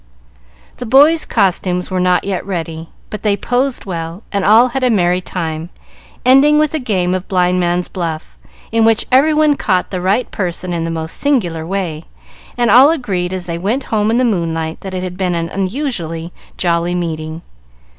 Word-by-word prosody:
The 245 Hz, -, -6 dB
boys' 295 Hz, +7 st, +5 dB
costumes 180 Hz, -1 st, 0 dB
were 185 Hz, -, 0 dB
not 180 Hz, 0 st, +2 dB
yet 195 Hz, -2 st, -3 dB
ready, 165 Hz, -4 st, -5 dB, 0.2 s
but 210 Hz, -, -5 dB
they 205 Hz, -1 st, +1 dB
posed 250 Hz, +5 st, -1 dB
well, 170 Hz, +1 st, -5 dB
and 200 Hz, -2 st, -1 dB
all 225 Hz, +5 st, +5 dB
had 265 Hz, +2 st, -3 dB
a 250 Hz, -, +3 dB
merry 180 Hz, -4 st, +2 dB
time, 165 Hz, -2 st, -4 dB, 0.6 s
ending 275 Hz, +4 st, +6 dB
with 305 Hz, 0 st, +2 dB
a 315 Hz, -, 0 dB
game 185 Hz, -8 st, 0 dB
of 185 Hz, 0 st, -3 dB
blind 180 Hz, -1 st, +1 dB
man's 175 Hz, 0 st, 0 dB
buff, 165 Hz, -4 st, -5 dB, 0.4 s
in 225 Hz, 0 st, +2 dB
which 225 Hz, -1 st, +3 dB
every 275 Hz, +5 st, +5 dB
one 305 Hz, -1 st, +3 dB
caught 185 Hz, -8 st, 0 dB
the 185 Hz, -2 st, -3 dB
right 200 Hz, +7 st, 0 dB
person 180 Hz, -2 st, -3 dB
in 165 Hz, -1 st, -2 dB
the -, -, -3 dB
most 160 Hz, 0 st, -4 dB
singular 175 Hz, -, 0 dB
way, 175 Hz, -4 st, -3 dB, 0.5 s
and 240 Hz, -3 st, +2 dB
all 260 Hz, +6 st, +8 dB
agreed 195 Hz, -, -1 dB
as 185 Hz, -1 st, -4 dB
they 170 Hz, -1 st, -4 dB
went 225 Hz, +9 st, -1 dB
home 210 Hz, 0 st, +2 dB
in 230 Hz, -, +2 dB
the 255 Hz, -, +2 dB
moonlight 165 Hz, -6 st, -2 dB
that 190 Hz, -1 st, -6 dB
it 185 Hz, -, -3 dB
had 180 Hz, -1 st, -6 dB
been 180 Hz, -2 st, -1 dB
an 165 Hz, 0 st, -2 dB
unusually 185 Hz, -, -3 dB, 0.2 s
jolly 175 Hz, 0 st, 0 dB
meeting. 160 Hz, -2 st, -4 dB
185 Hz, 185 wpm, -16 LUFS, 170-235 Hz, 0.6 s, all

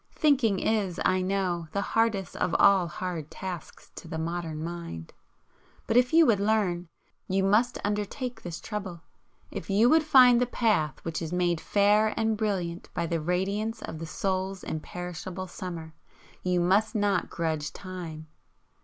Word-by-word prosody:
Thinking 265 Hz, -9 st, +3 dB
is, 200 Hz, -5 st, 0 dB
I 185 Hz, 0 st, +3 dB
know, 185 Hz, -3 st, -1 dB
the 200 Hz, -, 0 dB
hardest 220 Hz, -3 st, 0 dB
of 180 Hz, -, 0 dB
all 195 Hz, -3 st, +5 dB
hard 170 Hz, -3 st, -5 dB
tasks 185 Hz, -3 st, -8 dB
to -, -, -9 dB
the 160 Hz, -, -5 dB
modern 160 Hz, -1 st, -3 dB
mind. 170 Hz, -, -6 dB, 0.7 s
But 225 Hz, -, -1 dB
if 250 Hz, 0 st, +5 dB
you 325 Hz, 0 st, +7 dB
would 225 Hz, -7 st, +3 dB
learn, 200 Hz, -5 st, +1 dB, 0.4 s
you 190 Hz, +1 st, +1 dB
must 210 Hz, +5 st, +3 dB
undertake 215 Hz, +4 st, -3 dB
this 175 Hz, -1 st, -6 dB
trouble. 195 Hz, -6 st, -6 dB, 0.5 s
If -, -, -6 dB
you 210 Hz, +5 st, +4 dB
would 320 Hz, +1 st, +6 dB
find 255 Hz, -5 st, +6 dB
the 250 Hz, -, +2 dB
path 210 Hz, -, 0 dB
which 165 Hz, -2 st, -3 dB
is 165 Hz, -1 st, -4 dB
made 175 Hz, -2 st, +1 dB
fair 210 Hz, +2 st, +3 dB
and 220 Hz, 0 st, +1 dB
brilliant 190 Hz, -6 st, -2 dB
by -, -, 0 dB
the 165 Hz, -1 st, -1 dB
radiance 200 Hz, +7 st, -1 dB
of 160 Hz, -, -6 dB
the 165 Hz, -, -5 dB
soul's 190 Hz, +2 st, -2 dB
imperishable 180 Hz, +3 st, -5 dB
summer, 170 Hz, -3 st, -7 dB, 0.5 s
you 180 Hz, -1 st, +1 dB
must 205 Hz, +5 st, +2 dB
not 205 Hz, -1 st, +1 dB
grudge 155 Hz, -3 st, -2 dB
time. 175 Hz, -5 st, -7 dB
185 Hz, 155 wpm, -28 LUFS, 170-215 Hz, 0.7 s, you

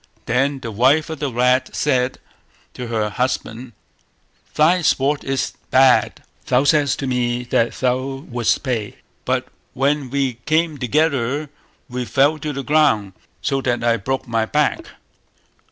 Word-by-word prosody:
Then 135 Hz, +3 st, 0 dB
the 115 Hz, -, -5 dB
wife 140 Hz, +9 st, +2 dB
of 160 Hz, -, -6 dB
the 140 Hz, -2 st, -2 dB
rat 125 Hz, +2 st, +1 dB
said 130 Hz, -3 st, +1 dB, 0.6 s
to 125 Hz, -, -6 dB
her 110 Hz, -2 st, -1 dB
husband 125 Hz, +1 st, -3 dB, 0.8 s
"Thy 170 Hz, +4 st, +4 dB
sport 145 Hz, -1 st, +1 dB
is 135 Hz, -1 st, -2 dB, 0.2 s
bad; 130 Hz, -1 st, +4 dB, 0.2 s
thou 125 Hz, +2 st, +3 dB
saidst 145 Hz, -1 st, +2 dB
to -, -, -2 dB
me 125 Hz, -1 st, -1 dB
that 120 Hz, -1 st, 0 dB
thou 130 Hz, +2 st, -2 dB
wouldst 120 Hz, -2 st, 0 dB
play, 115 Hz, -6 st, -3 dB, 0.3 s
but -, -, -1 dB, 0.3 s
when 140 Hz, 0 st, 0 dB
we 135 Hz, -3 st, -1 dB
came 155 Hz, -1 st, +1 dB
together 140 Hz, +1 st, 0 dB, 0.4 s
we 125 Hz, -1 st, -4 dB
fell 145 Hz, +5 st, +2 dB
to 150 Hz, 0 st, -3 dB
the 140 Hz, -1 st, -5 dB
ground, 125 Hz, -10 st, +2 dB, 0.3 s
so 135 Hz, -1 st, 0 dB
that 120 Hz, -2 st, -1 dB
I 115 Hz, 0 st, +2 dB
broke 130 Hz, +5 st, -3 dB
my 115 Hz, -1 st, 0 dB
back". 150 Hz, +3 st, 0 dB
130 Hz, 145 wpm, -20 LUFS, 120-145 Hz, 0.8 s, Thy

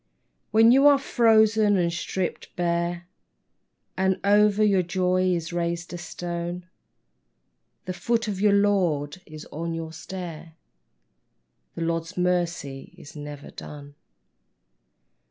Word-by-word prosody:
When 225 Hz, +2 st, +6 dB
you 270 Hz, +3 st, +6 dB
are 285 Hz, -1 st, +7 dB
frozen 220 Hz, -5 st, +3 dB
and 170 Hz, -2 st, +1 dB
stripped 180 Hz, +1 st, -4 dB
bare 170 Hz, 0 st, -1 dB, 0.9 s
And 190 Hz, 0 st, +1 dB
over 210 Hz, +1 st, +4 dB
your 200 Hz, -3 st, +4 dB
joy 185 Hz, +1 st, 0 dB
is 170 Hz, 0 st, -4 dB
raised 170 Hz, 0 st, -3 dB
a -, -, -4 dB
stone, 175 Hz, 0 st, -5 dB, 1.2 s
The 185 Hz, -, -3 dB
foot 230 Hz, +4 st, -1 dB
of 205 Hz, -2 st, -2 dB
the 205 Hz, +2 st, +3 dB
Lord 185 Hz, -6 st, +1 dB
is 155 Hz, 0 st, -10 dB
on 165 Hz, +2 st, -4 dB
your 160 Hz, -1 st, -6 dB
stair; 165 Hz, -1 st, -8 dB, 1.2 s
The 165 Hz, -, -3 dB
Lord's 165 Hz, +2 st, -3 dB
mercy 175 Hz, -6 st, -2 dB
is 145 Hz, -, -13 dB
never 145 Hz, -1 st, -8 dB
done. 145 Hz, -1 st, -10 dB
175 Hz, 120 wpm, -25 LUFS, 165-200 Hz, 1.2 s, are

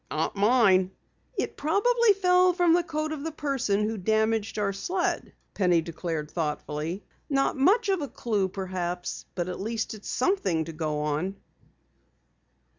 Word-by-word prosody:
"Not 155 Hz, +5 st, -1 dB
mine." 200 Hz, -3 st, +4 dB, 0.5 s
"It -, -, -2 dB
probably 435 Hz, +8 st, +3 dB
fell 365 Hz, -1 st, +4 dB
from 350 Hz, -2 st, +4 dB
the 350 Hz, -, +4 dB
coat 310 Hz, -2 st, -3 dB
of 300 Hz, -2 st, -4 dB
the 325 Hz, -, -3 dB
person 270 Hz, -9 st, 0 dB
who 220 Hz, -1 st, -3 dB
damaged 220 Hz, +2 st, +1 dB
our 200 Hz, -1 st, 0 dB
sled," 355 Hz, -, -2 dB, 0.2 s
Penny 180 Hz, -4 st, +3 dB
declared 160 Hz, -2 st, -4 dB
thoughtfully. 155 Hz, +2 st, -3 dB, 0.3 s
"Not 275 Hz, -1 st, +1 dB
much 395 Hz, -, +3 dB
of 380 Hz, -4 st, +1 dB
a 285 Hz, -, -2 dB
clue, 215 Hz, -5 st, -1 dB
perhaps, 180 Hz, -2 st, -4 dB
but 175 Hz, -1 st, -2 dB
at 180 Hz, -, -5 dB
least 225 Hz, +2 st, -2 dB
it's 210 Hz, -2 st, -9 dB
something 195 Hz, -, +1 dB
to 165 Hz, -, -7 dB
go 155 Hz, -2 st, -2 dB
on!" 150 Hz, +6 st, -1 dB
210 Hz, 150 wpm, -27 LUFS, -, 0.5 s, mine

